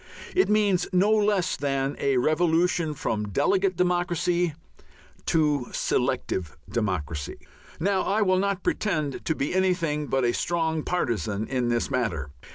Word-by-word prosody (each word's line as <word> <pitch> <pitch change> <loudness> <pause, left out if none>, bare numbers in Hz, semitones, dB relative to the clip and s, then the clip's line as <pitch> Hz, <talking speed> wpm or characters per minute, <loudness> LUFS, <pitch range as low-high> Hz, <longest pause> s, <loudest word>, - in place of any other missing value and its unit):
It 375 - +3
means 205 -4 +2
no 190 +3 +3
less 205 -4 +2
than 135 -1 -1
a 135 -2 +1
revolution 165 +3 +2
from 105 -5 -2
"delegate 185 - +1
democracy" 175 -2 +1 0.7
to 150 -5 +2
"selective 85 -5 -1
democracy." 85 -9 -2 0.4
Now, 190 +3 +1
I 210 +2 +1
will 185 -1 +3
not 200 -1 -1
pretend 155 -9 -1
to 160 - 0
be 140 - -2
anything 170 -6 +1
but 135 -2 +1
a 120 - +2
strong 160 -2 0
partizan 110 - -1
in 125 -2 -1
this 120 -1 0
matter. 85 - -1
160 Hz, 135 wpm, -26 LUFS, 125-185 Hz, 0.7 s, It